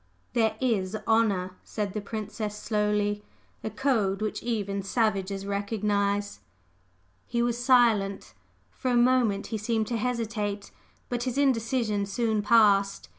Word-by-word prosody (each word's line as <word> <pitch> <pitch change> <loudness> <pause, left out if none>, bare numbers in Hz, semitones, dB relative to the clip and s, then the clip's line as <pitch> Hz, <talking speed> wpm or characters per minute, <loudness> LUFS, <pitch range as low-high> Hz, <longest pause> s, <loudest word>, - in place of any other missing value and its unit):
"There 220 -2 +2
is 215 -5 0
honor!" 200 -5 +1
said 205 -3 -4
the 210 - -3
Princess, 210 0 -5
slowly; 210 -1 0 0.4
"A - - -2
code 215 -5 0
which 215 0 -3
even 200 -4 -2
savages 195 -2 -1
recognize." 200 - -1 0.9
He 235 0 0
was 240 0 -1
silent. 220 - +3 0.4
For 255 - -3
a 245 - +2
moment 240 -4 +3
he 220 - -1
seemed 220 +1 0
to 235 - 0
hesitate; 215 -4 -2 0.4
but 240 0 -2
his 255 0 -2
indecision 230 -6 +1
soon 220 +1 0
passed. 205 -3 +3
215 Hz, 125 wpm, -27 LUFS, 200-235 Hz, 0.9 s, silent